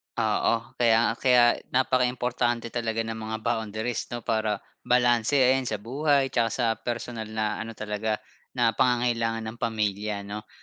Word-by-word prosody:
Oo, 110 0 +2 0.2
kaya 115 -1 +4
kaya 125 -2 +5
napakaimportante 125 -2 0
talaga 115 -1 -1
ng 110 0 -5
mga 110 0 -4
boundaries 110 0 -2
'no, 120 -1 -5
para 110 -2 0 0.3
balanse 120 +1 +3
ayan 130 -1 +4
sa 110 - -1
buhay 140 +2 +1
tsaka 115 -2 +2
sa 125 - 0
personal 120 -2 -4
na 110 -1 -2
ano 115 0 -6
talaga, 105 +1 -2 0.4
na 120 -2 +3
pangangailangan 115 -2 +1
ng 120 - -14
pamilya 105 -2 -1
'no? 105 +1 -7
115 Hz, 140 wpm, -26 LUFS, 110-125 Hz, 0.4 s, kaya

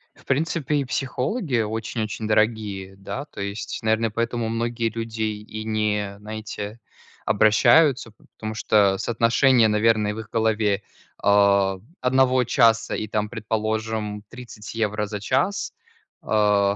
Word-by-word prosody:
В - - -22
принципе, 150 +1 0
и 140 - 0
психологи 135 - -1
очень-очень 110 0 -3
дорогие, 105 -3 0
да. 115 +8 -6
То 105 - -10
есть. 100 +2 -4
Наверно, 110 0 +1
поэтому 115 +1 -1
многие 115 0 -1
люди 115 0 -4
и 110 0 -4
не, 105 -2 -1
знаете, 110 0 -7 0.5
обращаются. 110 +5 +4
П 110 - -27
потому 110 0 -5
что 105 -3 +3
соотношение, 115 +1 +3
наверно, 105 0 +2
в 110 - -7
их 110 - -8
голове, 110 -3 +1 0.4
а, 100 -1 +3 0.2
1 130 0 +3
часа 115 -2 +3
и, 110 - -3
там, 105 0 -1
предположим, 110 -1 -3
30 115 -3 -10
евро 105 -1 -1
за 105 -1 -5
час. 130 - 0 0.5
А. 105 -2 +2
110 Hz, 130 wpm, -23 LUFS, 105-115 Hz, 0.5 s, обращаются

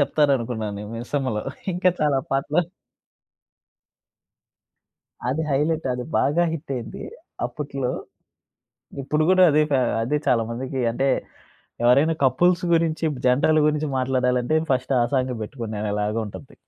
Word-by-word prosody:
చెప్తారనుకున్నానే 120 -8 0
'మిసమ్మలో.' 120 -2 -2 0.3
ఇంకా 180 +1 +3
చాలా 145 -3 +2
పాటలు 145 +5 +1 2.7
అది 150 +5 0
హైలైట్. 155 +3 0
అది 125 0 -4
బాగా 155 +6 +2
హిట్టయింది 135 -7 -5 0.4
అప్పుట్లో. 135 0 -4 1.1
ఇప్పుడు 150 +3 0
గూడా 185 0 +6
అదే 155 +1 +4
కా 135 - +3 0.2
అదే 150 +5 0
చాలా 115 -2 +3
మందికీ 130 +2 -4
అంటే, 135 +4 0 0.8
ఎవరైనా 140 +7 +4
కపుల్స్ 175 +7 +3
గురించి, 165 -1 +1 0.2
జంటలు 145 +5 +3
గురించి 150 0 0
మాట్లాడాలంటే, 125 +2 +1
ఫస్ట్ 130 +1 0
ఆ - - +4
సాంగే 130 -1 0
బెట్టుకునేలాగా 105 -2 -3
ఉంటుంది. 130 +6 -11
135 Hz, 110 wpm, -23 LUFS, 125-150 Hz, 2.7 s, గూడా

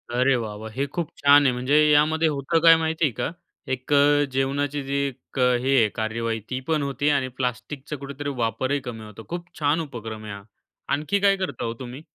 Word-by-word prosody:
अरे 130 +1 +3
वाह! 110 -2 -5
वाह! 110 +1 -8
हे 135 +4 -2
खूप 170 -3 -2
छान 145 0 +6
आहे. 130 - +4
म्हणजे 130 +4 0 0.2
यामध्ये 160 +2 +3
होतं 150 +3 0
काय 165 -1 +8
माहिती 160 0 -1
आहे 135 - +1
का? - - -2 0.4
एक 130 +2 -4 0.4
जेवणाची 140 +2 -1
जी 140 +1 -3
एक 135 0 -9
हे 125 +2 +2
आहे 110 -3 +4
कार्यवाही, 115 0 -2
ती 130 0 -2
पण 155 -3 +1
होती 140 +1 0
आणि 140 -3 +1
प्लास्टिकचा 125 +4 -4
कुठेतरी 140 +1 -6
वापरही 125 +4 -1
कमी 110 -2 -6
होतो. 105 +1 -11
खूप 175 +1 -5
छान 150 +2 +2
उपक्रम 115 -7 -7
आहे 105 - -6
हा. 100 0 -9 0.5
आणखी 155 +8 0
काय 200 0 +4
करता 185 -9 -4
हो 115 - -2
तुम्ही? 130 +3 -8
135 Hz, 200 wpm, -24 LUFS, 120-150 Hz, 0.5 s, काय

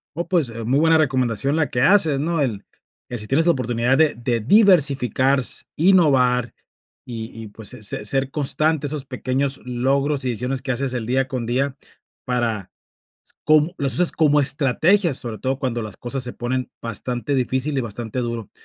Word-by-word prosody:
Oh, 170 +2 -4
pues, 165 -9 +1
eh, 115 0 -6
muy 130 +5 +1
buena 160 0 +4
recomendación 130 -1 +1
la 155 -4 0
que 120 - -1
haces, 160 -3 +4
¿no?, 165 +2 -1
el 110 -7 -2 0.4
que 120 - -4
si 105 -1 -6
tienes 150 +7 +2
la - - +6
oportunidad 125 -1 0
de 155 0 +3
de 120 0 -1
diversificar 140 - +4
s 125 - 0
innovar 135 - +3 0.5
y 115 -2 -7
y, - - -8
pues, 105 0 -6
se - - -6
se 105 0 -2
ser 135 +4 +1
constante 155 +2 0
esos 145 -1 -3
pequeños 130 +1 -2
logros 135 +3 0
y 130 - -1
decisiones 125 +3 -3
que 135 - -3
haces 130 +1 -2
el 120 -3 -4
día 130 +2 0
con 130 -4 -4
día 130 +3 -1 0.5
para 120 -6 -2 0.7
cómo, 155 +3 +3
las 135 -3 0
usas 175 +6 +3
como 150 -2 +3
estrategias, 155 +5 +2
sobre 115 -5 -4
todo 130 0 -2
cuando 125 -3 -2
las 110 -3 -7
cosas 130 +2 -3
se 125 -1 -3
ponen 125 +1 -3
bastante 120 +4 -3
difícil 130 +2 -1
y - - +1
bastante 115 +1 -5
duro. 115 -3 -4
130 Hz, 185 wpm, -21 LUFS, 120-145 Hz, 0.7 s, la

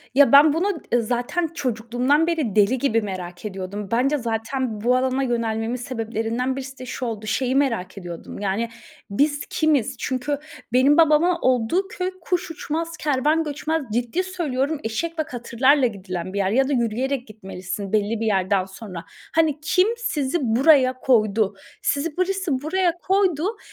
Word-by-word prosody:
Ya, 285 0 +6
ben 290 +2 +8
bunu 345 +6 +1 0.3
zaten 245 +9 -1
çocukluğumdan 250 +4 +1
beri 305 - -1
deli 210 +5 +4
gibi 230 -3 +1
merak 185 -2 -6
ediyordum. 195 0 -5
Bence 270 +5 +2
zaten 230 -1 -3
bu 245 +2 +3
alana 260 +1 +1
yönelmemin 230 -2 -1
sebeplerinden 235 +1 -2
birisi 265 -1 -7
de 255 - -7
şu 250 0 -4
oldu. 220 -2 -4
Şeyi 255 +3 0
merak 230 -10 0
ediyordum. 175 -2 -8
Yani, 205 +4 -1 0.4
biz 290 +8 +1
kimiz? 285 -5 +1
Çünkü 265 +3 -2 0.3
benim 265 +4 +5
babama 330 +2 +4
olduğu 255 - +1
köy 370 -1 -3
kuş 350 0 -2
uçmaz, 330 +1 -4
kervan 300 +3 +1
göçmez. 310 +2 -2
Ciddi 245 +10 0
söylüyorum, 315 -6 -2
eşek 325 +10 -3
ve - - +2
katırlarla 255 +2 +2
gidilen 185 -4 -6
bir - - -3
yer 195 -1 +1
ya 265 +4 +3
da - - +1
yürüyerek 245 +2 -1
gitmelisin 195 -1 -7
belli 215 +1 +1
bir 225 - -1
yerden 190 -2 +1
sonra. 190 -3 -9 0.3
Hani, 315 -3 +2
kim 365 +5 +3
sizi 300 - -1
buraya 260 +2 +4
koydu. 215 -5 +2 0.3
Sizi 300 +3 -1
birisi 380 -2 0
buraya 345 +2 0
koydu. 380 +1 +1
255 Hz, 150 wpm, -23 LUFS, 220-305 Hz, 0.4 s, ben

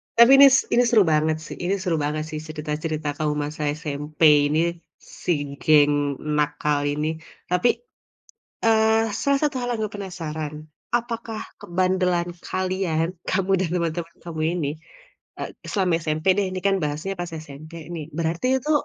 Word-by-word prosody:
tapi 235 +3 +8
ini 280 - +11
s 265 0 +5
ini 245 +1 +5
seru 220 -4 +5
banget 155 +1 +2
sih - - -7
ini 190 +3 +1
seru 185 -4 -1
banget 155 +1 -1
sih 155 - -4
cerita-cerita 155 0 -4
kamu 150 -1 +1
masa 150 +1 -6 0.2
SMP 150 0 -6 0.3
ini, 155 +2 +1 0.6
si 180 - 0 0.3
geng 145 -2 +4 0.2
nakal 150 0 +1
ini 150 +1 -1 0.4
tapi, 180 +7 +3 1.0
eee, 220 -1 +3
salah 280 -1 +2
satu 290 -3 0
hal 245 - -3
yang - - -6
aku 210 - -5
penasaran 160 -5 -5 0.4
apakah 230 -2 -4 0.2
kebandelan 180 -1 0 0.2
kalian 185 -3 -1 0.2
kamu 195 0 0
dan 170 -3 -1
teman-teman 170 0 -2
kamu 160 -2 -5 0.2
ini, 145 -3 -1 0.7
eee, - - -4 0.2
selama 185 -4 +1
SMP 155 +2 -2
deh 200 - +2
ini 185 - -4
kan 195 0 +3
bahasnya 150 +6 -3
pas 175 -1 -4
SMP 155 +3 -11 0.2
nih 155 -3 -5
berarti 165 +8 -1
itu 300 +4 -4
170 Hz, 155 wpm, -23 LUFS, 155-195 Hz, 1.0 s, ini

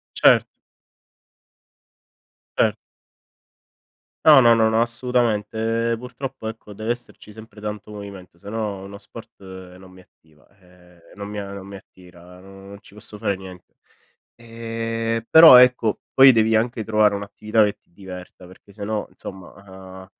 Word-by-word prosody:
Cert - - +5 2.1
Cert - - +2 1.5
No, 150 -4 +8
no, 120 0 +6
no 110 0 +2
assolutamente. 115 -1 -1
Ehm, - - -1
purtroppo 125 -1 -8
ecco 110 -2 -9
deve 110 +3 -5
esserci 120 -3 -13
sempre 110 0 -15
tanto 105 0 -7
movimento 100 -4 -11
se 100 +4 -12
no 105 -3 -4
uno 100 +1 -10
sport - - -14 0.4
non 95 0 -16
mi 95 0 -16
attiva, 80 -3 -29
ehm, 90 -2 -23
non 100 0 -8
mi 105 0 -7
a 100 0 -8
non 95 -1 -10
mi 100 0 -10
attira, 90 -1 -17
non 95 +1 -14
ci - - -19
posso 105 0 -13
fare 100 -2 -2
niente. 95 -2 -14 0.6
Ehm, 115 0 -5
però 160 -5 +10
ecco, 125 -3 +4
poi 135 0 +7
devi 110 -1 +2
anche 115 -1 -2
trovare 105 -1 +2
un'attività 105 +2 0
che 105 - -3
ti - - -38
diverta 90 -1 -11
perché 95 +2 -18
se 100 0 -8
no 110 0 -3
insomma, 95 -1 -11 0.5
uhm, - - -15
105 Hz, 145 wpm, -21 LUFS, 95-115 Hz, 2.1 s, però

